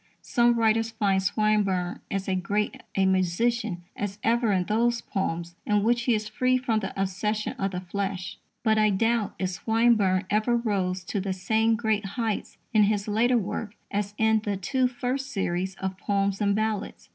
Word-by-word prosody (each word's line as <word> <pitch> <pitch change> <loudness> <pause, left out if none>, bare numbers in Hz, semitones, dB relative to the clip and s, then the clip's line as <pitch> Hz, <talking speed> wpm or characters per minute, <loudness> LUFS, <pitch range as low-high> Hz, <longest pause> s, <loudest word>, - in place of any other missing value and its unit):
Some 240 0 +3
writers 225 0 +2
find 205 -4 +1
Swinburne 200 -3 +1
as 195 -1 -3
great 205 +4 -1
a 195 - +3
magician 190 +2 +1
as 200 -1 -4
ever 235 -1 +2
in 185 -2 +2
those 235 +4 +1
poems 170 -4 -3
in 210 -1 +1
which 235 +1 +2
he 240 - +3
is 215 0 -3
free 255 0 +2
from 235 -4 0
the 195 -1 -5
obsession 210 +3 -1
of 195 - 0
the 180 -1 -4
flesh. 190 0 -4 0.2
But 220 -2 +3
I 215 0 +4
doubt 225 +2 +1
if 185 -1 -1
Swinburne 215 -2 +2
ever 220 +3 +2
rose 190 -5 -1
to 195 +2 -2
the 190 0 -2
same 220 +4 +2
great 220 -2 0
heights 225 -3 -2 0.2
in 215 -2 +6
his 205 0 0
later 235 +4 +3
work 210 0 -3 0.2
as 205 0 -2
in 220 0 +3
the 205 -2 -1
two 260 +6 +1
first 255 +2 -3
series 190 -2 -2
of 190 -1 -4
_Poems 200 0 0
and 200 -1 +2
Ballads. 215 -1 -2
210 Hz, 175 wpm, -26 LUFS, 190-225 Hz, 0.2 s, in